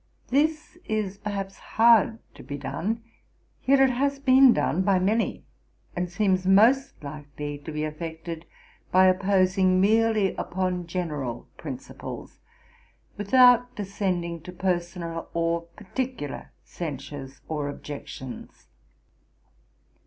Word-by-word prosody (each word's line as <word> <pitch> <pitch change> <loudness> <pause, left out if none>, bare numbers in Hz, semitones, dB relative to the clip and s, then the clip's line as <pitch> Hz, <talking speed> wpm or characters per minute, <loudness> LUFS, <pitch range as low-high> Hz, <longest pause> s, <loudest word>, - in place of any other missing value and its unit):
This 310 +5 0
is, 205 -3 -2
perhaps, 195 -2 -4
hard 225 -1 +4 0.2
to - - -13
be 140 - -6
done; 220 +10 -3 0.6
yet 275 +1 +6
it 270 -1 +5
has 275 +3 0
been 265 -1 +6
done 180 -5 +1
by 195 0 +3
many, 210 +5 0 0.5
and 180 0 -2
seems 185 0 +1
most 225 - +4
likely 145 0 -6
to 150 +2 -8
be 150 0 -3
effected 160 +1 -6 0.4
by 185 +1 +6
opposing 185 0 +3
merely 215 -1 +3
upon 180 -1 -2
general 150 -9 -4
principles, - - -8 0.8
without 245 +3 +5
descending 185 -4 -2
to 180 - -9
personal 175 -2 -3
or 170 0 0
particular 220 - -5
censures 140 -3 -7
or 150 -2 -2
objections. 140 -3 -8
185 Hz, 110 wpm, -26 LUFS, 165-220 Hz, 0.8 s, yet